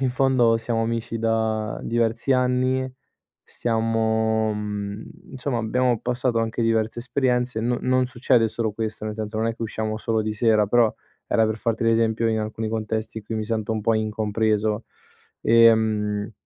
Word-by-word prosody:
in 130 Hz, -1 st, +1 dB
fondo 125 Hz, -3 st, +3 dB
siamo 115 Hz, 0 st, -1 dB
amici 115 Hz, 0 st, -2 dB
da 110 Hz, -1 st, -1 dB
diversi 115 Hz, +3 st, 0 dB
anni, 130 Hz, +1 st, +1 dB, 0.6 s
siamo 110 Hz, -1 st, 0 dB
mhmm, 105 Hz, 0 st, -4 dB, 0.3 s
insomma 130 Hz, -1 st, -2 dB
abbiamo 120 Hz, +2 st, +1 dB
passato 125 Hz, -1 st, 0 dB
anche 115 Hz, +1 st, -1 dB
diverse 115 Hz, 0 st, 0 dB
esperienze, 125 Hz, -1 st, 0 dB
non 120 Hz, +1 st, 0 dB
non 130 Hz, 0 st, +2 dB
succede 120 Hz, -1 st, +2 dB
solo 110 Hz, 0 st, -2 dB
questo, 110 Hz, 0 st, -4 dB
nel 105 Hz, 0 st, -3 dB
senso 110 Hz, 0 st, -4 dB
non 110 Hz, +1 st, 0 dB
è 115 Hz, -, -2 dB
che -, -, -6 dB
usciamo 110 Hz, -1 st, -3 dB
solo 110 Hz, 0 st, -1 dB
di 110 Hz, 0 st, -2 dB
sera, 110 Hz, -1 st, +3 dB
però 115 Hz, +1 st, +3 dB, 0.3 s
era 110 Hz, -, +3 dB
per 110 Hz, 0 st, -1 dB
farti 115 Hz, 0 st, -2 dB
l'esempio 115 Hz, 0 st, +2 dB
in 110 Hz, -1 st, 0 dB
alcuni 110 Hz, +1 st, -3 dB
contesti 110 Hz, 0 st, -3 dB
in 110 Hz, -, -12 dB
cui 115 Hz, -, -5 dB
mi 110 Hz, 0 st, -2 dB
sento 110 Hz, 0 st, -2 dB
un 110 Hz, -, -2 dB
po' 115 Hz, +2 st, +2 dB
incompreso. 110 Hz, 0 st, 0 dB, 0.6 s
Ehm 110 Hz, -2 st, +3 dB
115 Hz, 165 wpm, -23 LUFS, 110-120 Hz, 0.6 s, fondo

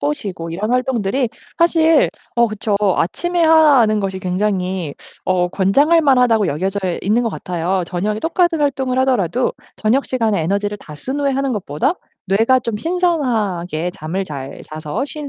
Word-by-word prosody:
보시고 165 Hz, +4 st, -3 dB
이런 205 Hz, +7 st, -3 dB
활동들이 250 Hz, -1 st, 0 dB, 0.3 s
사실 325 Hz, -2 st, +4 dB, 0.3 s
어 235 Hz, 0 st, +5 dB
그쵸. 215 Hz, 0 st, -2 dB, 0.2 s
아침에 345 Hz, -, 0 dB
하는 285 Hz, -10 st, +5 dB
것이 190 Hz, -1 st, -3 dB
굉장히 185 Hz, -3 st, -2 dB, 0.3 s
어 180 Hz, -1 st, +2 dB
권장할 275 Hz, -, +3 dB
만하다고 250 Hz, -7 st, +3 dB
여겨져 185 Hz, +7 st, -1 dB, 0.2 s
있는 215 Hz, +5 st, +2 dB
것 230 Hz, -, 0 dB
같아요. 180 Hz, -1 st, -2 dB
저녁에 205 Hz, +5 st, -2 dB
똑같은 335 Hz, -, +1 dB
활동을 265 Hz, -3 st, 0 dB
하더라도 250 Hz, -3 st, +1 dB, 0.2 s
저녁 240 Hz, +6 st, +1 dB
시간에 225 Hz, -7 st, 0 dB
에너지를 200 Hz, +4 st, -1 dB
다 150 Hz, -, -11 dB
쓴 265 Hz, -, -4 dB
후에 280 Hz, -1 st, +1 dB
하는 270 Hz, 0 st, -1 dB
것보다 210 Hz, -, -1 dB, 0.3 s
뇌가 225 Hz, +7 st, +3 dB
좀 230 Hz, -3 st, -3 dB
신선하게 220 Hz, -, -1 dB
잠을 180 Hz, +2 st, -4 dB
잘 140 Hz, -6 st, -7 dB
자서 155 Hz, -, -4 dB
쉰 290 Hz, 0 st, -7 dB
215 Hz, 335 characters per minute, -18 LUFS, 185-270 Hz, 0.3 s, 어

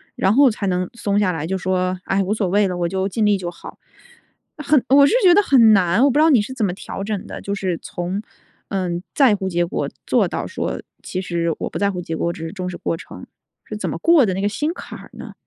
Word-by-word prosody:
然 195 Hz, -, +2 dB
后 275 Hz, -1 st, +6 dB
才 205 Hz, -2 st, -4 dB
能 180 Hz, -1 st, 0 dB
松 205 Hz, -3 st, -1 dB
下 205 Hz, -3 st, +2 dB
来， 160 Hz, -2 st, -4 dB
就 190 Hz, +2 st, -1 dB
说： 185 Hz, 0 st, -1 dB
唉， 195 Hz, +1 st, +1 dB
无 195 Hz, +3 st, -1 dB
所 210 Hz, -3 st, -1 dB
谓 200 Hz, +2 st, +2 dB
了， 180 Hz, -1 st, -3 dB
我 175 Hz, -1 st, 0 dB
就 190 Hz, +2 st, -1 dB
尽 215 Hz, +3 st, 0 dB
力 205 Hz, -1 st, +3 dB
就 175 Hz, -2 st, -5 dB
好。 170 Hz, -, -12 dB, 0.8 s
“很 295 Hz, -3 st, +2 dB
我 280 Hz, +1 st, +7 dB
是 -, -, +1 dB
觉 360 Hz, -2 st, +7 dB
得 410 Hz, -, +6 dB
很 240 Hz, -, +5 dB
难， 185 Hz, +1 st, +3 dB
我 285 Hz, -, +5 dB
不 285 Hz, -, 0 dB
知 -, -, +6 dB
道 320 Hz, -, +5 dB
你 260 Hz, -8 st, +5 dB
是 245 Hz, +5 st, -6 dB
怎 230 Hz, -5 st, -1 dB
么 180 Hz, -, -1 dB
调 195 Hz, +1 st, -7 dB
整 205 Hz, -2 st, -4 dB
的？ -, -, -8 dB
就 200 Hz, -, -4 dB
是 185 Hz, -4 st, -2 dB
从， 180 Hz, +4 st, -4 dB, 0.5 s
嗯， 180 Hz, -3 st, -2 dB
在 260 Hz, -7 st, +5 dB
乎 190 Hz, -1 st, -3 dB
结 175 Hz, 0 st, 0 dB
果， -, -, -3 dB, 0.2 s
做 -, -, +2 dB
到 -, -, -4 dB
说： -, -, -4 dB, 0.2 s
“其 185 Hz, -, -4 dB
实 170 Hz, -2 st, -1 dB
我 -, -, -3 dB
不 -, -, -5 dB
在 200 Hz, 0 st, +1 dB
乎 180 Hz, -2 st, -5 dB
结 165 Hz, -2 st, -5 dB
果， 170 Hz, -, -2 dB
我 -, -, 0 dB
只 165 Hz, -, -7 dB
是 165 Hz, -, -6 dB
重 185 Hz, -2 st, -4 dB
视 180 Hz, -, -7 dB
过 -, -, -2 dB
程。” -, -, -11 dB, 0.4 s
是 -, -, -6 dB
怎 -, -, -3 dB
么 -, -, -4 dB
过 330 Hz, -6 st, +4 dB
的 190 Hz, -, 0 dB
那 190 Hz, -, -2 dB
个 200 Hz, -, +1 dB
心 300 Hz, +10 st, -1 dB
坎 -, -, -9 dB
儿 -, -, -13 dB
呢？ -, -, -10 dB
195 Hz, 290 characters per minute, -20 LUFS, 180-220 Hz, 0.8 s, 我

